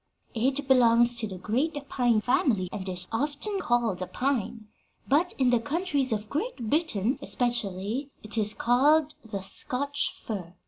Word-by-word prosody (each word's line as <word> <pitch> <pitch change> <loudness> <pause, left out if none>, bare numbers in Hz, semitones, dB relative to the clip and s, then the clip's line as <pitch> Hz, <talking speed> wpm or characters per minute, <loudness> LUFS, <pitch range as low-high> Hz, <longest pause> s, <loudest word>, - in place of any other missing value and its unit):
It 265 +4 0
belongs 240 -2 +5
to 225 -2 -1
the 190 -2 -7
great 255 - -1
pine 240 -5 +2
family 215 -6 +1
and 195 -2 -5
is 180 0 -2
often 295 - -2
called 235 - 0
a 185 - -3
pine, 240 -4 -2 0.4
but 320 +7 +2
in 255 -2 +3
the 240 - +4
countries 290 -1 -1
of 210 -1 -2
Great 285 - -3
Britain 275 - 0
especially 235 +1 -2
it 215 +1 +1
is 215 -1 0
called 290 +5 +3
the 205 -4 -6
Scotch 280 +8 -1
fir. 185 -5 -6
240 Hz, 150 wpm, -27 LUFS, 215-280 Hz, 0.4 s, belongs